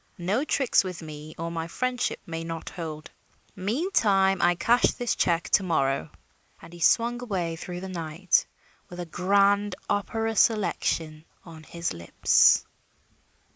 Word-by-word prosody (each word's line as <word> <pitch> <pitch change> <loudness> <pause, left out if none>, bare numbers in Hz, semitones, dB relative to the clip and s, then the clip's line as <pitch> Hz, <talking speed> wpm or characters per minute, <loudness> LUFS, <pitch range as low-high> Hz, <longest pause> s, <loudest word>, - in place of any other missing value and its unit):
No 195 +9 0
tricks 280 -7 +2
with 180 -3 -6
me 155 0 -9
or 165 +1 -4
my 165 -1 -4
friendship 250 +7 -2
may 165 -2 -5
not 165 -1 -6
hold. 155 -3 -7 0.4
Meantime, 195 - +1
I 175 0 +4
cash 230 +8 +3
this 245 -1 -1
check 170 -2 0
to - - +4
morrow." 135 - 0 0.5
And 170 - -14
he 175 - -11
swung 235 +7 +2
away 180 -8 -2
through 175 +2 -7
the 190 - -6
night 170 0 0 0.4
with 175 - -9
a 175 - -4
grand 200 +3 +2
opera 225 +2 -1
selection 170 -7 +1 0.2
on 165 -2 -11
his 170 - -4
lips. 85 -1 +4
180 Hz, 140 wpm, -26 LUFS, 165-205 Hz, 0.5 s, I